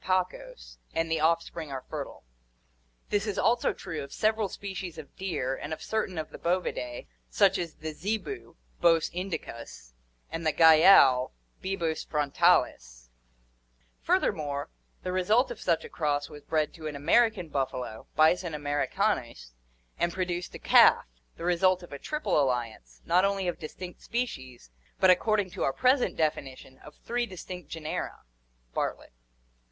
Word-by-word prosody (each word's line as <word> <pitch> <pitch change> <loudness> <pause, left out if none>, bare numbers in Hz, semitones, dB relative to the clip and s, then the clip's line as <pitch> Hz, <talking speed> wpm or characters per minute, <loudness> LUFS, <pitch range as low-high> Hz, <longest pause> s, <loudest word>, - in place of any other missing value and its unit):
pacos, 185 - -3 0.2
and 165 0 0
the 160 - +1
offspring 165 -1 0
are 130 -1 -5
fertile. - - -6 0.9
This 205 +1 +1
is 205 - -2
also 235 0 +2
true 155 -4 -6
of 140 - -10
several 215 -1 +1
species 190 -4 -6
of 155 -3 -11
deer 165 -9 -2
and 145 - -7
of 160 - -5
certain 215 -5 -2
of 155 -1 -4
the - - -10
Bovidae, 170 -9 -2 0.2
such 190 - +3
as 170 -3 -4
the 155 0 -6
zebu, 220 - -4 0.3
Bos 165 -2 +4
indicus, 140 - -6 0.4
and 165 0 -4
the 155 - +2
gayal, 155 - +7 0.3
Bibos 170 -4 -2
frontalis; - - +1 0.9
furthermore, 140 - 0 0.3
the 180 - -2
result 210 +8 +2
of - - -8
such 165 -2 +1
a - - -9
cross 145 -2 -1
was 150 -1 -10
bred 155 -1 0
to 160 -2 -7
an 150 - -5
American 185 +6 +3
buffalo, 130 -6 -3
Bison 160 +1 +3
americanus, 145 - -1 0.5
and 170 - +1
produced 180 -1 -3
a - - -7
calf, - - +6 0.3
the 170 - -6
result 180 +1 +3
of 175 - -11
a 140 - -6
triple 300 - 0
alliance, 115 - -3
not 180 +2 +4
only 195 -1 +1
of 175 - -2
distinct 175 +3 -8
species, 130 - -4 0.3
but, 190 - +7
according 205 +1 +2
to 185 - -7
our - - +2
present 255 0 +2
definition, 135 -4 -3
of 150 - -14
three 240 0 -1
distinct 180 -3 -8
genera 160 -1 -5 0.5
(Bart - - -1
lett). - - -18
165 Hz, 150 wpm, -28 LUFS, 145-190 Hz, 0.9 s, gayal